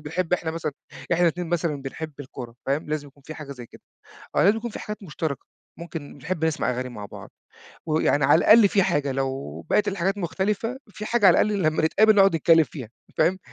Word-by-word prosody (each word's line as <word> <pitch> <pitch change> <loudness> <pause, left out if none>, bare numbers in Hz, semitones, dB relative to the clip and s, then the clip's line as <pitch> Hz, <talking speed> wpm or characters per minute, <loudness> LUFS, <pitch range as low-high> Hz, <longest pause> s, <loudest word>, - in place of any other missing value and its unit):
بنحب 165 +3 -3
إحنا 170 -2 0
مثلًا 160 -2 -4 0.4
إحنا 170 +1 +2
الاتنين 175 +1 +1
مثلًا 165 -4 -1
بنحب 155 +3 -6
الكورة 125 -3 -9
فاهم؟ 140 +3 -1
لازم 150 -1 -3
يكون 140 +1 -23
في 155 - -7
حاجة 150 -3 -8
زي 125 -3 -10
كده. - - -17 0.6
آه، - - +5
لازم 205 +3 +5
يكون 235 +1 -4
في - - -7
حاجات 210 0 -7
مشتركة، 155 -6 -4 0.3
ممكن 165 -4 -8
بنحب 160 +3 -3
نسمع 155 -6 0
أغاني 125 +1 -3
مع 105 -4 -8
بعض - - -11 0.6
ويعني 155 -2 +2
على 145 +4 +6
الأقل 215 +3 +7
في 195 0 +3
حاجة 145 -5 0
لو 135 0 -3
بقيت 210 0 +3
الحاجات 195 +1 -1
مختلفة، 205 +7 -2
في 210 +1 -8
حاجة 235 -3 +3
على 180 - +6
الأقل 210 -2 +1
لمّا 155 -1 +1
نتقابل 215 +7 +4
نقعد 195 -4 +5
نتكلّم 165 0 +5
فيها 135 -7 -9 0.3
فاهم؟ 175 +4 +3
160 Hz, 205 wpm, -24 LUFS, 145-195 Hz, 0.6 s, الأقل